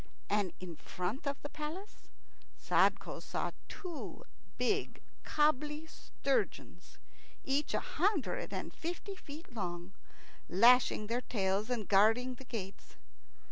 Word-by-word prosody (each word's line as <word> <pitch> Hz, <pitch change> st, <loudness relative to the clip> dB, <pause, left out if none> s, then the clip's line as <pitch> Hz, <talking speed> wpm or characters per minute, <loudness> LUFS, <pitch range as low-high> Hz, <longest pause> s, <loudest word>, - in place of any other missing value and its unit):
And 205 Hz, -3 st, +2 dB
in 175 Hz, -3 st, -7 dB
front 205 Hz, +11 st, -3 dB
of 280 Hz, 0 st, -1 dB
the 290 Hz, -, -4 dB
palace 315 Hz, +7 st, -7 dB, 0.5 s
Sadko -, -, +2 dB
saw -, -, -2 dB, 0.2 s
two 350 Hz, -6 st, -6 dB, 0.3 s
big 410 Hz, -1 st, 0 dB, 0.2 s
kobbly 300 Hz, +1 st, +2 dB
sturgeons, 430 Hz, +7 st, -2 dB, 0.5 s
each 280 Hz, +2 st, +1 dB
a -, -, +3 dB
hundred 380 Hz, -6 st, 0 dB
and -, -, -4 dB
fifty 350 Hz, +4 st, -4 dB
feet 305 Hz, -6 st, -10 dB
long, 180 Hz, -3 st, -4 dB, 0.6 s
lashing 235 Hz, +3 st, +6 dB
their 235 Hz, +3 st, 0 dB
tails 200 Hz, -1 st, 0 dB
and 235 Hz, -5 st, -1 dB
guarding 225 Hz, +6 st, +5 dB
the 260 Hz, +1 st, -12 dB
gates. 200 Hz, -6 st, -6 dB
250 Hz, 115 wpm, -34 LUFS, 205-305 Hz, 0.6 s, lashing